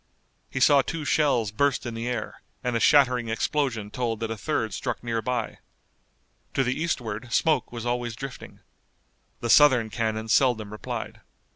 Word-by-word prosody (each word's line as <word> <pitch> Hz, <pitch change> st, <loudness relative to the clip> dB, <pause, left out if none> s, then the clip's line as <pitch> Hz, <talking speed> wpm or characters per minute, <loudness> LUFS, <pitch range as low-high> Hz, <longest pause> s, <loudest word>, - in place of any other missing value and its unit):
He 130 Hz, -, -3 dB
saw 140 Hz, +1 st, +6 dB
two 160 Hz, +2 st, -5 dB
shells 135 Hz, -9 st, +2 dB
burst 140 Hz, +4 st, +1 dB
in 120 Hz, -, -4 dB
the 115 Hz, +1 st, -4 dB
air, 120 Hz, -3 st, -4 dB, 0.2 s
and 125 Hz, -1 st, -1 dB
a -, -, +2 dB
shattering 125 Hz, -3 st, +4 dB
explosion 115 Hz, -3 st, -1 dB
told 115 Hz, -3 st, -2 dB
that 115 Hz, -1 st, -3 dB
a -, -, -2 dB
third 110 Hz, -2 st, -2 dB
struck -, -, -4 dB
near 115 Hz, -1 st, -1 dB
by. 120 Hz, -1 st, -3 dB, 1.0 s
To 135 Hz, -, +3 dB
the 125 Hz, 0 st, 0 dB
eastward 125 Hz, -7 st, -3 dB
smoke 150 Hz, -6 st, +2 dB
was 120 Hz, -1 st, -6 dB
always 120 Hz, -1 st, -2 dB
drifting. 135 Hz, +4 st, -9 dB, 0.8 s
The 120 Hz, -, -3 dB
Southern 130 Hz, -7 st, +6 dB
cannon 110 Hz, -1 st, -2 dB
seldom 110 Hz, -4 st, +2 dB
replied. 105 Hz, -, -6 dB
120 Hz, 160 wpm, -26 LUFS, 115-135 Hz, 1.0 s, saw